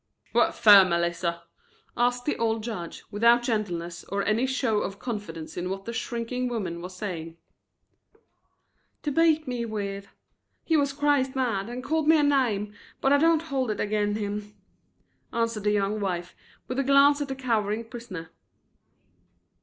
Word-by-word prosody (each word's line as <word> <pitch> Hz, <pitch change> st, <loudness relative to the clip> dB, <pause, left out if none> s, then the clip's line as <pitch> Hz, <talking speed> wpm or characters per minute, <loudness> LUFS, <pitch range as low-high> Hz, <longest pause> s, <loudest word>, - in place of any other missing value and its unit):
"What -, -, +3 dB
fer, 205 Hz, -3 st, +8 dB
Melissa?" 170 Hz, -1 st, -1 dB, 0.5 s
asked 245 Hz, 0 st, +1 dB
the 295 Hz, -, 0 dB
old 225 Hz, -1 st, 0 dB
judge, 195 Hz, -8 st, -6 dB
without 235 Hz, +3 st, +4 dB
gentleness 175 Hz, -7 st, -2 dB
or 200 Hz, +1 st, -2 dB
any 225 Hz, +5 st, +2 dB
show 260 Hz, -5 st, +1 dB
of 195 Hz, -1 st, -4 dB
confidence 200 Hz, -10 st, -6 dB
in 180 Hz, +1 st, -3 dB
what 195 Hz, +1 st, -5 dB
the 235 Hz, -, -5 dB
shrinking 240 Hz, +2 st, -3 dB
woman 190 Hz, -8 st, -3 dB
was 180 Hz, +1 st, -8 dB
saying. 165 Hz, -4 st, -5 dB, 1.7 s
"To 295 Hz, -, -1 dB
beat 320 Hz, 0 st, +3 dB
me 245 Hz, -2 st, -2 dB
with. 200 Hz, -3 st, -4 dB, 0.6 s
He 325 Hz, -, +1 dB
war 285 Hz, -2 st, +3 dB
crazed 280 Hz, -1 st, +1 dB
mad 230 Hz, -6 st, -1 dB
and 245 Hz, +1 st, -6 dB
called 315 Hz, +2 st, 0 dB
me 320 Hz, 0 st, +7 dB
a 300 Hz, -, +3 dB
name, 235 Hz, -8 st, +1 dB, 0.3 s
but 270 Hz, -, +3 dB
I 285 Hz, -, +5 dB
don't 325 Hz, +1 st, +3 dB
hold 270 Hz, -6 st, -2 dB
it 215 Hz, -, -2 dB
ag'in 210 Hz, 0 st, 0 dB
him," 210 Hz, 0 st, -4 dB, 0.8 s
answered 230 Hz, -3 st, -1 dB
the 210 Hz, -, +3 dB
young 205 Hz, +1 st, 0 dB
wife, 180 Hz, -3 st, -3 dB, 0.3 s
with 255 Hz, +1 st, -3 dB
a -, -, +2 dB
glance 280 Hz, +2 st, +5 dB
at 290 Hz, -, -2 dB
the 270 Hz, -, -4 dB
cowering 225 Hz, -4 st, -1 dB
prisoner. 210 Hz, -9 st, -8 dB
225 Hz, 160 wpm, -26 LUFS, 200-260 Hz, 1.7 s, fer